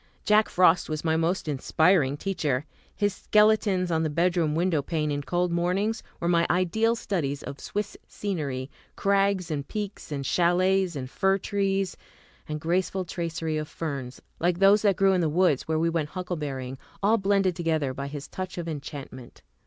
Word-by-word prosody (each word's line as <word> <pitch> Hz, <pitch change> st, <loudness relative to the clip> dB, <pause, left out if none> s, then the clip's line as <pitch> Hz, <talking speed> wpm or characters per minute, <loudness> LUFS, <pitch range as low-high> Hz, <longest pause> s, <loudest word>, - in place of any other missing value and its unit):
Jack 215 Hz, 0 st, +4 dB
Frost 180 Hz, -1 st, +4 dB
was 155 Hz, -1 st, -3 dB
my 160 Hz, -1 st, +2 dB
most 165 Hz, +2 st, 0 dB
inspiring 150 Hz, +1 st, +2 dB
teacher. 150 Hz, -7 st, -1 dB, 0.3 s
His 205 Hz, -1 st, +1 dB
sketches 210 Hz, -4 st, +3 dB
on 160 Hz, -1 st, +1 dB
the 160 Hz, -, 0 dB
bedroom 170 Hz, -1 st, +1 dB
window 170 Hz, -2 st, +1 dB
pane 150 Hz, +1 st, -1 dB
in 145 Hz, 0 st, -1 dB
cold 175 Hz, +4 st, 0 dB
mornings 185 Hz, +6 st, 0 dB, 0.2 s
were 170 Hz, -, -2 dB
my 170 Hz, -1 st, +3 dB
ideal 220 Hz, +6 st, +2 dB
studies 145 Hz, -11 st, -2 dB
of 140 Hz, 0 st, -7 dB
Swiss 205 Hz, 0 st, -4 dB
scenery, 145 Hz, -9 st, -4 dB, 0.2 s
crags 195 Hz, -3 st, +1 dB
and 140 Hz, -2 st, -3 dB
peaks 205 Hz, -5 st, -5 dB
and 140 Hz, -2 st, -3 dB
chalets 180 Hz, +2 st, +2 dB
and 130 Hz, -2 st, -4 dB
fir 195 Hz, +8 st, +1 dB
trees, 195 Hz, -1 st, -1 dB, 0.5 s
and 155 Hz, 0 st, -3 dB
graceful 180 Hz, +3 st, 0 dB
tracery 165 Hz, -2 st, -3 dB
of 155 Hz, 0 st, -3 dB
ferns, 140 Hz, -7 st, -5 dB, 0.2 s
like 175 Hz, 0 st, +1 dB
those 195 Hz, +2 st, +5 dB
that 200 Hz, -3 st, +3 dB
grew 195 Hz, +1 st, +4 dB
in 185 Hz, -, +2 dB
the 160 Hz, -, +1 dB
woods 160 Hz, -3 st, +2 dB
where 160 Hz, 0 st, +1 dB
we 165 Hz, +1 st, +2 dB
went 165 Hz, -3 st, -1 dB
huckleberrying, 145 Hz, -8 st, -4 dB, 0.2 s
all 220 Hz, +3 st, +4 dB
blended 195 Hz, -2 st, +2 dB
together 160 Hz, -6 st, 0 dB
by 140 Hz, +1 st, -5 dB
his 145 Hz, 0 st, -7 dB
touch 185 Hz, -1 st, -6 dB
of 170 Hz, -1 st, -4 dB
enchantment. 140 Hz, -5 st, -8 dB
170 Hz, 170 wpm, -26 LUFS, 150-195 Hz, 0.5 s, those